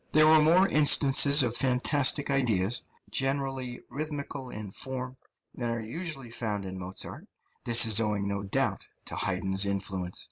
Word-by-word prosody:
There 155 Hz, 0 st, +5 dB
are 155 Hz, 0 st, +5 dB
more 175 Hz, +5 st, +4 dB
instances 145 Hz, -2 st, +5 dB
of 120 Hz, -1 st, -2 dB
fantastic 135 Hz, +3 st, +2 dB
ideas, 120 Hz, -5 st, +1 dB, 0.3 s
generally 135 Hz, -2 st, -3 dB
rhythmical 145 Hz, -3 st, -6 dB
in 105 Hz, -4 st, -8 dB
form, 130 Hz, +2 st, -4 dB, 0.4 s
than 120 Hz, -2 st, -4 dB
are 115 Hz, 0 st, -3 dB
usually 135 Hz, +1 st, -7 dB
found 105 Hz, -4 st, -4 dB
in 95 Hz, 0 st, -7 dB
Mozart; 95 Hz, +1 st, -6 dB, 0.4 s
this 120 Hz, 0 st, +6 dB
is 110 Hz, -1 st, +5 dB
owing, 105 Hz, -3 st, -2 dB
no 100 Hz, 0 st, -3 dB
doubt, 100 Hz, -1 st, -3 dB, 0.2 s
to -, -, -5 dB
Haydn's 95 Hz, 0 st, 0 dB
influence. 95 Hz, -2 st, -3 dB
125 Hz, 145 wpm, -27 LUFS, 100-140 Hz, 0.4 s, this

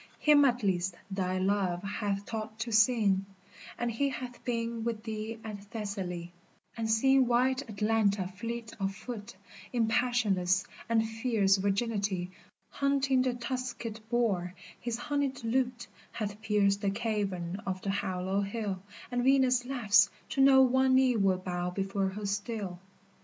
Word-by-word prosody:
him 295 Hz, -1 st, +5 dB
at 245 Hz, -3 st, +1 dB
least 180 Hz, -2 st, 0 dB, 0.2 s
thy 185 Hz, -1 st, -1 dB
love 185 Hz, -2 st, 0 dB
hath 200 Hz, 0 st, -2 dB
taught 220 Hz, 0 st, -5 dB
to 230 Hz, +1 st, -4 dB
sing, 215 Hz, -3 st, +4 dB, 0.5 s
And 240 Hz, 0 st, -1 dB
he 275 Hz, +5 st, 0 dB
hath 250 Hz, -1 st, -7 dB
been 230 Hz, -2 st, -2 dB
with 225 Hz, -2 st, -3 dB
thee 220 Hz, 0 st, -4 dB
at 205 Hz, -2 st, -7 dB
Thessaly, 195 Hz, -5 st, -5 dB, 0.4 s
And 225 Hz, -1 st, -2 dB
seen 265 Hz, +3 st, +4 dB
white 255 Hz, +2 st, +2 dB
Atalanta 210 Hz, -2 st, +1 dB
fleet 230 Hz, +4 st, -6 dB
of 195 Hz, 0 st, -1 dB
foot 220 Hz, 0 st, -7 dB, 0.4 s
In 235 Hz, -3 st, +1 dB
passionless 210 Hz, -6 st, +2 dB, 0.2 s
and 225 Hz, -1 st, +2 dB
fierce 220 Hz, -4 st, +2 dB
virginity 200 Hz, -2 st, -1 dB, 0.4 s
Hunting 275 Hz, -2 st, +2 dB
the 255 Hz, -1 st, 0 dB
tusked 240 Hz, -2 st, -4 dB
boar, 200 Hz, -7 st, 0 dB, 0.2 s
his 240 Hz, -1 st, -3 dB
honied 275 Hz, 0 st, -2 dB
lute 240 Hz, +1 st, 0 dB, 0.3 s
Hath 210 Hz, -1 st, -4 dB
pierced 200 Hz, -2 st, +2 dB
the 200 Hz, -, +1 dB
cavern 195 Hz, -4 st, -2 dB
of 185 Hz, -1 st, -3 dB
the 195 Hz, -, 0 dB
hollow 190 Hz, 0 st, -1 dB
hill, 200 Hz, -2 st, -3 dB, 0.3 s
And 245 Hz, 0 st, 0 dB
Venus 260 Hz, -2 st, +4 dB
laughs 215 Hz, -6 st, +4 dB, 0.2 s
to 270 Hz, -, 0 dB
know 270 Hz, -1 st, +7 dB
one 260 Hz, +1 st, +4 dB
knee 260 Hz, -2 st, +4 dB
will 195 Hz, -3 st, +3 dB
bow 180 Hz, -1 st, -3 dB
before 195 Hz, +1 st, -1 dB
her 205 Hz, +2 st, -6 dB
still. 200 Hz, -2 st, -3 dB
220 Hz, 145 wpm, -30 LUFS, 195-245 Hz, 0.5 s, know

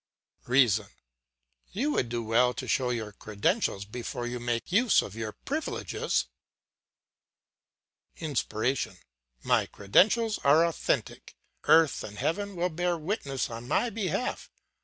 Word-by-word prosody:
"REASON: 120 Hz, -5 st, +4 dB, 0.9 s
You 270 Hz, +10 st, 0 dB
would 120 Hz, -, 0 dB
do 120 Hz, 0 st, -2 dB
well 120 Hz, +3 st, +3 dB
to -, -, -5 dB
show 130 Hz, -2 st, +1 dB
your 115 Hz, -3 st, -3 dB
credentials 105 Hz, -, -1 dB
before 120 Hz, +2 st, -5 dB
you 120 Hz, 0 st, -4 dB
make 120 Hz, +2 st, -2 dB
use 225 Hz, +4 st, +4 dB
of 100 Hz, -, -8 dB
your 110 Hz, -1 st, -5 dB
privileges. 310 Hz, +3 st, -1 dB, 1.9 s
"INSPIRATION: 125 Hz, -, -1 dB, 0.5 s
My -, -, +2 dB
credentials 215 Hz, -, +3 dB
are 155 Hz, +4 st, +5 dB
authentic, 170 Hz, -2 st, -2 dB, 0.3 s
earth 160 Hz, -1 st, +5 dB
and 105 Hz, 0 st, -8 dB
heaven 200 Hz, -, -2 dB
will 175 Hz, +1 st, 0 dB
bear 175 Hz, +1 st, -1 dB
witness 150 Hz, -, -3 dB
on 115 Hz, +1 st, -7 dB
my 235 Hz, -, +1 dB
behalf. 215 Hz, +3 st, -2 dB
135 Hz, 120 wpm, -28 LUFS, 115-180 Hz, 1.9 s, are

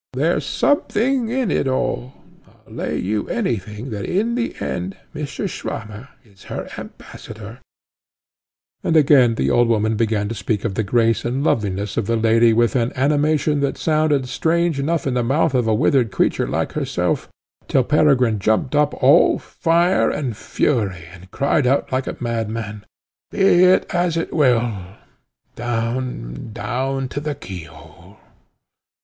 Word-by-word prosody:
There's -, -, 0 dB
something 260 Hz, -3 st, +1 dB
in 250 Hz, -2 st, 0 dB
it -, -, 0 dB
all. 130 Hz, 0 st, -2 dB, 0.5 s
I'll -, -, -16 dB
lay -, -, -3 dB
you 105 Hz, +2 st, -2 dB
any 195 Hz, -, 0 dB
thing 105 Hz, +6 st, -8 dB
that 100 Hz, -2 st, -4 dB
in 215 Hz, -, 0 dB
the 240 Hz, 0 st, -2 dB
end 90 Hz, +2 st, -4 dB, 0.2 s
Mr. 150 Hz, +6 st, -4 dB
Swammer 110 Hz, -, -6 dB, 0.2 s
is 100 Hz, -4 st, -20 dB
her -, -, -5 dB
ambassador 110 Hz, 0 st, -10 dB
to 105 Hz, -1 st, -8 dB
you." 120 Hz, -, -14 dB, 1.3 s
And 165 Hz, -, +4 dB
again 135 Hz, -6 st, +5 dB
the -, -, 0 dB
old 120 Hz, 0 st, +4 dB
woman 110 Hz, -1 st, +1 dB
began 110 Hz, -2 st, 0 dB
to 115 Hz, -, -4 dB
speak 105 Hz, 0 st, -2 dB
of 110 Hz, -, -1 dB
the 110 Hz, -, -1 dB
grace 115 Hz, +1 st, +1 dB
and 130 Hz, +4 st, -2 dB
loveliness 100 Hz, -6 st, -1 dB
of 115 Hz, -4 st, 0 dB
the 115 Hz, -, +1 dB
lady 115 Hz, +1 st, +4 dB
with 120 Hz, +2 st, +2 dB
an 120 Hz, -1 st, +1 dB
animation 150 Hz, +2 st, +1 dB
that 140 Hz, -1 st, -1 dB
sounded 155 Hz, -4 st, +1 dB
strange 165 Hz, +2 st, 0 dB
enough 160 Hz, +3 st, -1 dB
in 135 Hz, -, 0 dB
the 125 Hz, -, +1 dB
mouth 140 Hz, +5 st, +1 dB
of 125 Hz, -3 st, +1 dB
a 110 Hz, -, +3 dB
withered 120 Hz, 0 st, +2 dB
creature 95 Hz, -, +1 dB
like -, -, -2 dB
herself, -, -, -2 dB, 0.4 s
till 130 Hz, -, +2 dB
Peregrine 130 Hz, -6 st, +3 dB
jumped 110 Hz, +6 st, 0 dB
up 150 Hz, 0 st, +2 dB
all 140 Hz, +6 st, +6 dB
fire 170 Hz, +2 st, +1 dB
and 130 Hz, -7 st, -3 dB
fury, 100 Hz, -, -1 dB
and 90 Hz, +1 st, -14 dB
cried 140 Hz, +3 st, +1 dB
out 135 Hz, +3 st, +1 dB
like 130 Hz, 0 st, -1 dB
a -, -, -4 dB
madman, 110 Hz, -3 st, -4 dB, 0.5 s
"Be 185 Hz, -2 st, +4 dB
it 185 Hz, +1 st, +4 dB
as 175 Hz, -1 st, +1 dB
it 165 Hz, -, -3 dB
will 120 Hz, -6 st, +2 dB, 0.8 s
down, 115 Hz, -, -3 dB
down 130 Hz, +3 st, -2 dB
to 145 Hz, -, -4 dB
the 150 Hz, 0 st, -3 dB
key 90 Hz, -9 st, -8 dB
hole!" 75 Hz, -1 st, -16 dB
125 Hz, 160 wpm, -20 LUFS, 110-150 Hz, 1.3 s, all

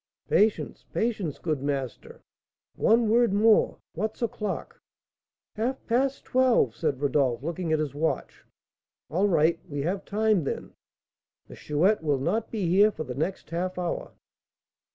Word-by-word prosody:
"Patience, 215 Hz, 0 st, +1 dB
patience, 210 Hz, -, -1 dB
good 155 Hz, -5 st, -2 dB
master; 140 Hz, -3 st, -4 dB, 0.5 s
one 230 Hz, +1 st, +3 dB
word 235 Hz, 0 st, +4 dB
more. 215 Hz, +1 st, +4 dB, 0.2 s
What's 215 Hz, +6 st, -3 dB
o'clock?" 215 Hz, -3 st, -4 dB, 0.7 s
"Half 245 Hz, +5 st, -3 dB
past 260 Hz, +3 st, 0 dB
twelve," 250 Hz, -, +3 dB
said 135 Hz, -, -1 dB
Rodolph, 135 Hz, -3 st, +1 dB
looking 170 Hz, +1 st, -3 dB
at 155 Hz, -, +3 dB
his 150 Hz, -3 st, -2 dB
watch. 160 Hz, +3 st, -2 dB, 0.7 s
"All 185 Hz, +6 st, +2 dB
right; 165 Hz, -2 st, +3 dB
we 145 Hz, -1 st, -3 dB
have 190 Hz, +5 st, -2 dB
time, 215 Hz, -3 st, +1 dB
then. 140 Hz, -, -4 dB, 0.8 s
The -, -, -10 dB
Chouette 170 Hz, +8 st, +1 dB
will 145 Hz, -3 st, +1 dB
not 185 Hz, +12 st, -1 dB
be 205 Hz, -6 st, -2 dB
here 200 Hz, +5 st, +5 dB
for 195 Hz, -, -5 dB
the 130 Hz, -, -6 dB
next 160 Hz, +9 st, -3 dB
half 180 Hz, +2 st, -2 dB
hour." 175 Hz, -1 st, -3 dB
180 Hz, 140 wpm, -27 LUFS, 150-215 Hz, 0.8 s, here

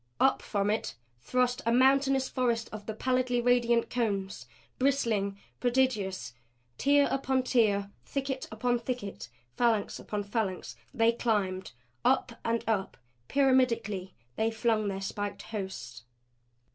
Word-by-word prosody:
Up 265 Hz, -, +4 dB
from 205 Hz, -1 st, 0 dB
it 220 Hz, -, -2 dB, 0.2 s
thrust 250 Hz, -, 0 dB
a 230 Hz, -, +1 dB
mountainous 265 Hz, +1 st, +4 dB
forest 235 Hz, -3 st, 0 dB
of 210 Hz, -1 st, -8 dB
the 220 Hz, -, -2 dB
pallidly 255 Hz, 0 st, +1 dB
radiant 240 Hz, -1 st, +3 dB
cones; 200 Hz, -5 st, -2 dB, 0.3 s
bristling; 230 Hz, -7 st, +1 dB, 0.2 s
prodigious. 235 Hz, -, 0 dB, 0.5 s
Tier 285 Hz, 0 st, +4 dB
upon 265 Hz, -1 st, +1 dB
tier, 205 Hz, -6 st, +2 dB
thicket 270 Hz, -1 st, -3 dB
upon 240 Hz, +2 st, 0 dB
thicket, 235 Hz, -, -5 dB, 0.3 s
phalanx 230 Hz, -4 st, +1 dB
upon 210 Hz, -1 st, -3 dB
phalanx 195 Hz, -, -3 dB, 0.2 s
they 225 Hz, -, +3 dB
climbed. 205 Hz, -, -1 dB, 0.3 s
Up 260 Hz, -2 st, +3 dB
and 230 Hz, 0 st, 0 dB
up, 210 Hz, -4 st, -1 dB, 0.3 s
pyramidically, 230 Hz, -8 st, +2 dB, 0.2 s
they 220 Hz, +1 st, +2 dB
flung 225 Hz, -1 st, +1 dB
their 195 Hz, -1 st, -3 dB
spiked 200 Hz, 0 st, -4 dB
hosts. 125 Hz, -, -6 dB
230 Hz, 120 wpm, -30 LUFS, 200-255 Hz, 0.5 s, Up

